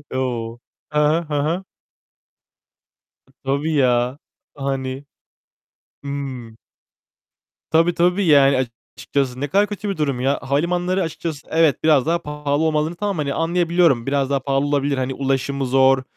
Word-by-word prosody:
O! 120 -3 -3 0.3
Hı 150 - +1
hı. 155 +3 +3
Hı 150 -3 -2
hı. 170 +6 -1 1.6
T - - -27
tabii, 140 +4 -1
ya, 125 0 +2 0.4
hani 135 0 -3 1.0
Hıı. 135 -5 -6 1.2
Tabii, 165 +2 +4
tabii, 180 +3 +2
yani, 140 -4 +5 0.3
açıkçası 130 0 -2
ne 145 - -1
kadar 200 +8 +2
kötü 205 0 -5
bir 195 - -3
durum 140 -5 -1
ya. 135 +2 +1
Havalimanları 175 +7 0
açıkçası 160 -2 -5
evet, 160 -5 +2
biraz 150 -4 +4
daha 170 +1 +1
pahalı 150 0 -2
olmalı 155 +1 0
tamam, 200 -4 -1
hani, 140 -2 -1
anlayabiliyorum. 170 -6 +2
Biraz 135 -1 0
daha 140 -1 +1
pahalı 135 +1 0
olabilir. 145 -1 0
Hani, 130 0 -1
ulaşımı 135 0 -1
zor, 130 0 +4
140 Hz, 135 wpm, -21 LUFS, 135-165 Hz, 1.6 s, yani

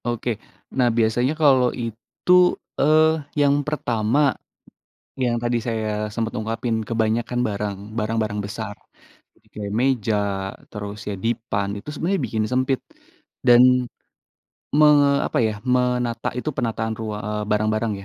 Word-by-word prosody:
Oke, 120 0 -2 0.5
nah 125 -2 +4
biasanya 120 +5 +2
kalau 135 -4 +5
itu, 115 +9 -4 0.5
eee, 155 +2 +5 0.4
yang 140 0 +4
pertama, 120 -4 0 1.0
yang 120 -1 +1
tadi 120 0 +1
saya 110 -1 -1 0.3
sempet 115 0 -2
ungkapin 115 +1 -2
kebanyakan 115 +2 0
barang, 100 -1 -3 0.2
barang-barang 110 -1 -1
besar, 105 0 -6 0.8
kayak 105 -1 -5
meja, 120 -5 +1 0.6
terus 105 0 -6
ya - - -2
dipan, 115 -4 -1
itu 100 - -11
sebenarnya 180 +6 -1
bikin 110 -1 -1
sempit 130 +1 +1 0.7
dan, 120 0 +8 1.1
me 150 +1 +6 0.4
apa - - -1
ya, 110 - -1 0.2
menata 125 -2 0
itu 155 - -2
penataan 110 -3 -1
rua 105 -2 -4
eee, 105 0 -2
barang-barang 110 +1 +1
115 Hz, 120 wpm, -22 LUFS, 110-125 Hz, 1.1 s, dan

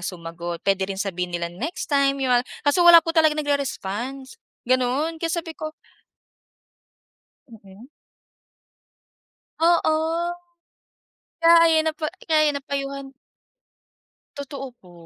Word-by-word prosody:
sumagot 170 -1 -6
pwede 195 -1 +1
rin 195 - -4
sabihin 180 -2 -3
nilang 175 0 -5
next 320 0 -5
time 275 -1 +3
yun, 255 -3 +2 0.2
kaso 290 +5 +2
wala 340 -1 +8
po 330 - -2
talaga 315 -2 +3
nagre-response, 270 -3 -3 0.2
ganon 255 +6 0
kaya 330 - -1
sabi 330 -1 -3
ko 310 0 -6 1.8
Mm. 210 0 -15 1.7
Oo, 330 -1 +3 1.4
kaya 335 0 +7
ayun 320 -1 +3
po - - -18 0.3
kaya 310 -1 +4
na-payuhan 275 -1 -5 1.2
Totoo 275 -1 -7
po 180 -6 -19
275 Hz, 105 wpm, -23 LUFS, 195-315 Hz, 1.8 s, wala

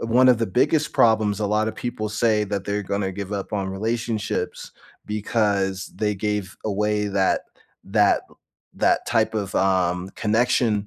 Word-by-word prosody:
one 125 +3 +4
of 125 - +6
the 115 0 -1
biggest 150 - +1
problems 110 -2 +3
a 105 - +1
lotta 110 +1 +1
people 110 -3 -4
say 110 0 +2
that 100 -1 -3
they're 105 0 -2
gonna 100 0 -2
give 100 +1 -6
up 100 +1 -4
on 100 -2 -1
relationships 110 +2 -3 0.3
because 100 -3 0
they 105 -1 0
gave 105 -1 -2
away 105 0 0
that 95 -1 +1 0.4
that 105 +1 +3
l - - -23 0.4
that - - +2
type 115 -2 +1
of, 100 -3 -3
um, 90 -1 +1
connection 110 -1 +1
105 Hz, 155 wpm, -23 LUFS, 100-110 Hz, 0.4 s, of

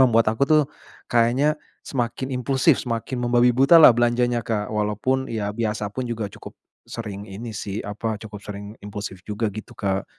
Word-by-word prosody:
membuat 115 -4 +5
aku 140 +5 0
tuh 155 -1 +6 0.5
kayaknya 125 +6 +3 0.3
semakin 130 +1 -3
impulsif 130 +1 +2
semakin 120 +2 -2
membabi 120 0 +4
butalah 135 +2 +8
belanjanya 120 0 +2
Kak 105 -2 -2
walaupun 105 +6 0
ya 105 -2 -2
biasa 105 -1 -2
pun 130 - -3
juga 115 -2 -3
cukup - - -11 0.3
sering 105 -3 -6
ini 110 +4 -7
sih, 100 0 -5
apa, 110 +2 -3
cukup 105 -2 -9
sering 100 0 -8
impulsif 100 -2 -7
juga 105 0 -2
gitu 110 +2 -9
Kak. 95 -1 -1
115 Hz, 160 wpm, -23 LUFS, 105-125 Hz, 0.5 s, butalah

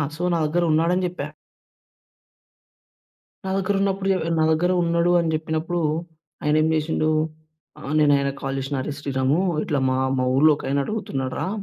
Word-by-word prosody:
So, 175 - -5
నా - - +2
దగ్గరున్నాడని 170 +2 +1
జెప్పా. 165 -5 -5 2.2
నా - - -2
దగ్గరున్నప్పుడు 195 0 0
య - - 0 0.2
నా - - +4
దగ్గరున్నాడు 170 0 +2
అని 165 -1 0
జెప్పినప్పుడు, 160 +2 -2 0.6
ఆయనేమి 155 +1 +2
జేసిండు 155 0 0 0.7
ఆహ్, 145 -1 -6
నేనాయనకి 140 -2 +2
కాల్ 135 -1 -3
జేసినా, 135 +1 -3
అరే 150 - -4
శ్రీరామూ, 135 +2 0 0.2
ఇట్లా 145 -3 -1
మా 130 - +1 0.2
మా 130 - +1
ఊర్లో 155 +3 +6
ఒకాయన 140 +1 -1
అడుగుతున్నాడురా 145 -8 -3
155 Hz, 130 wpm, -23 LUFS, 140-175 Hz, 2.2 s, ఊర్లో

